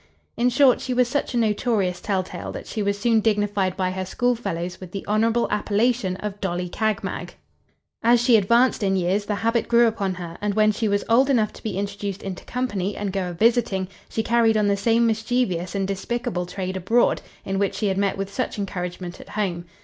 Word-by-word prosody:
"In 245 Hz, +1 st, +2 dB
short 260 Hz, 0 st, +4 dB
she 255 Hz, -, -2 dB
was 250 Hz, -1 st, +3 dB
such 265 Hz, 0 st, -2 dB
a -, -, +2 dB
notorious 210 Hz, -5 st, +1 dB
telltale, 190 Hz, -3 st, -3 dB
that -, -, -7 dB
she 215 Hz, -, -4 dB
was 200 Hz, 0 st, 0 dB
soon 225 Hz, +2 st, +3 dB
dignified 205 Hz, -3 st, 0 dB
by 185 Hz, -1 st, 0 dB
her 190 Hz, 0 st, -3 dB
school 245 Hz, +7 st, +1 dB
fellows 180 Hz, -6 st, -4 dB
with 185 Hz, -1 st, -10 dB
the 195 Hz, -, -5 dB
honourable 225 Hz, +3 st, +2 dB
appellation 210 Hz, -1 st, +1 dB
of 205 Hz, +1 st, -6 dB
Dolly 180 Hz, -2 st, -2 dB
Cagmag. 220 Hz, +3 st, -2 dB, 0.7 s
As 235 Hz, +1 st, +5 dB
she 240 Hz, 0 st, +4 dB
advanced 235 Hz, +5 st, +3 dB
in 195 Hz, -1 st, +1 dB
years, 190 Hz, +3 st, 0 dB
the 210 Hz, -, -1 dB
habit 230 Hz, +4 st, 0 dB
grew 235 Hz, 0 st, +5 dB
upon 200 Hz, -4 st, 0 dB
her; 170 Hz, -2 st, -8 dB
and 205 Hz, -1 st, -1 dB
when 215 Hz, 0 st, +4 dB
she 220 Hz, +1 st, -1 dB
was 200 Hz, 0 st, +1 dB
old 255 Hz, +4 st, +4 dB
enough 225 Hz, -6 st, +2 dB
to -, -, -13 dB
be 210 Hz, -4 st, -4 dB
introduced 200 Hz, 0 st, -4 dB
into 190 Hz, -2 st, -6 dB
company, 205 Hz, -6 st, -2 dB
and 200 Hz, -2 st, -3 dB
go 190 Hz, -2 st, -1 dB
a -, -, -5 dB
visiting, 215 Hz, -1 st, +2 dB, 0.2 s
she 220 Hz, -, -1 dB
carried 230 Hz, -1 st, +3 dB
on 210 Hz, -1 st, +2 dB
the 200 Hz, -, +3 dB
same 230 Hz, +3 st, +2 dB
mischievous 220 Hz, -5 st, 0 dB
and 195 Hz, -1 st, 0 dB
despicable 200 Hz, -1 st, -3 dB
trade 185 Hz, 0 st, -4 dB
abroad, 210 Hz, +6 st, +2 dB, 0.2 s
in 195 Hz, 0 st, -1 dB
which 200 Hz, -1 st, 0 dB
she 215 Hz, -, -2 dB
had 190 Hz, -2 st, 0 dB
met 200 Hz, 0 st, +1 dB
with 195 Hz, 0 st, -4 dB
such 255 Hz, -, -2 dB
encouragement 180 Hz, -2 st, -5 dB
at -, -, -14 dB
home. 180 Hz, -5 st, -2 dB
205 Hz, 210 wpm, -23 LUFS, 190-230 Hz, 0.7 s, As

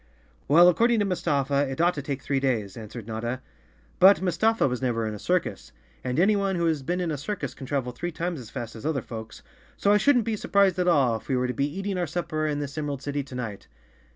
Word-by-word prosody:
"Well, 170 Hz, +5 st, +7 dB
according 230 Hz, +7 st, +4 dB
to 205 Hz, -, +2 dB
Mustafa, 145 Hz, -6 st, 0 dB
it 135 Hz, -, -5 dB
ought 175 Hz, +1 st, +4 dB
to 145 Hz, -, -4 dB
take 140 Hz, -1 st, -4 dB
three 140 Hz, -1 st, 0 dB
days," 115 Hz, -8 st, -1 dB
answered 115 Hz, 0 st, -8 dB
Notta. 115 Hz, +3 st, -3 dB, 0.6 s
"But 195 Hz, +2 st, +8 dB
Mustafa 190 Hz, +4 st, +2 dB
was 125 Hz, -1 st, -3 dB
never 115 Hz, -3 st, 0 dB
in 110 Hz, -, -3 dB
a 105 Hz, -, -7 dB
circus, 180 Hz, -, -1 dB, 0.3 s
and 125 Hz, +3 st, -1 dB
anyone 200 Hz, 0 st, +3 dB
who 170 Hz, -1 st, 0 dB
has 160 Hz, -3 st, +1 dB
been 175 Hz, +7 st, -2 dB
in 175 Hz, -3 st, -1 dB
a 150 Hz, -, -3 dB
circus 205 Hz, +8 st, -4 dB
can 135 Hz, -, -9 dB
travel 130 Hz, -3 st, -1 dB
three 175 Hz, +8 st, -4 dB
times 170 Hz, 0 st, -3 dB
as 115 Hz, -3 st, -10 dB
fast 115 Hz, +1 st, -6 dB
as 110 Hz, -, -9 dB
other 150 Hz, -3 st, -1 dB
folks, 110 Hz, -1 st, -8 dB, 0.3 s
so 200 Hz, -, +2 dB
I -, -, +6 dB
shouldn't 245 Hz, +1 st, +3 dB
be 225 Hz, -, -1 dB
sur¬ -, -, -8 dB
prised 195 Hz, -2 st, +4 dB
at 180 Hz, -, +1 dB
all 135 Hz, -9 st, +3 dB
if -, -, -15 dB
we 130 Hz, -, +1 dB
were 125 Hz, -, +1 dB
to 125 Hz, -, -2 dB
be 140 Hz, +2 st, 0 dB
eating 195 Hz, +2 st, -3 dB
our 175 Hz, -, 0 dB
supper 155 Hz, -1 st, -2 dB
in 150 Hz, -1 st, -1 dB
this 145 Hz, +1 st, -4 dB
Emerald 145 Hz, -3 st, -4 dB
City 145 Hz, 0 st, -2 dB
to 130 Hz, -2 st, -10 dB
night. 110 Hz, -5 st, -5 dB
145 Hz, 245 wpm, -26 LUFS, 125-180 Hz, 0.6 s, But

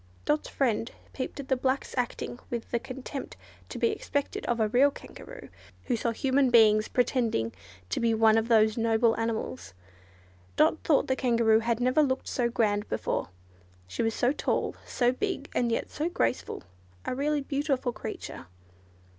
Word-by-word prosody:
Dot's 300 Hz, +1 st, 0 dB
friend 235 Hz, -3 st, 0 dB, 0.2 s
peeped 265 Hz, +2 st, -5 dB
at 275 Hz, -, -6 dB
the 265 Hz, -, +2 dB
black's 260 Hz, +1 st, -1 dB
acting 245 Hz, -1 st, -3 dB
with 235 Hz, -2 st, -5 dB
the 235 Hz, -, +1 dB
contempt 265 Hz, +3 st, -7 dB, 0.3 s
to -, -, -6 dB
be 460 Hz, -, +2 dB
expected 285 Hz, -9 st, -3 dB
of 240 Hz, -1 st, 0 dB
a 220 Hz, -, +3 dB
real 255 Hz, +6 st, +4 dB
Kangaroo, -, -, -11 dB, 0.3 s
who 245 Hz, -, 0 dB
saw 235 Hz, +1 st, -1 dB
human 265 Hz, +3 st, +2 dB
beings 215 Hz, -3 st, +5 dB
pretending 235 Hz, -, 0 dB, 0.4 s
to -, -, 0 dB
be 230 Hz, -1 st, +2 dB
one 220 Hz, 0 st, +5 dB
of 225 Hz, 0 st, +2 dB
those 220 Hz, -1 st, +4 dB
noble 225 Hz, 0 st, +3 dB
animals. 220 Hz, -, -3 dB, 0.8 s
Dot 320 Hz, -, +3 dB
thought 300 Hz, -, +3 dB
the 260 Hz, -, 0 dB
Kangaroo 230 Hz, -4 st, +3 dB
had 230 Hz, 0 st, 0 dB
never 255 Hz, +4 st, +3 dB
looked 265 Hz, -3 st, 0 dB
so 240 Hz, -2 st, 0 dB
grand 210 Hz, -3 st, 0 dB
before. -, -, -2 dB, 0.6 s
She 90 Hz, -, -4 dB
was 225 Hz, -1 st, 0 dB
so 245 Hz, -, +2 dB
tall, 295 Hz, -, -1 dB
so 245 Hz, -1 st, +2 dB
big, 295 Hz, +1 st, -3 dB
and 240 Hz, -1 st, +1 dB
yet 230 Hz, -, -2 dB
so 310 Hz, +3 st, -2 dB
graceful: 340 Hz, -, -1 dB, 0.4 s
a -, -, -1 dB
really 290 Hz, +3 st, 0 dB
beautiful 275 Hz, -3 st, -1 dB
creature. 150 Hz, -, -7 dB
245 Hz, 165 wpm, -28 LUFS, 225-275 Hz, 0.8 s, beings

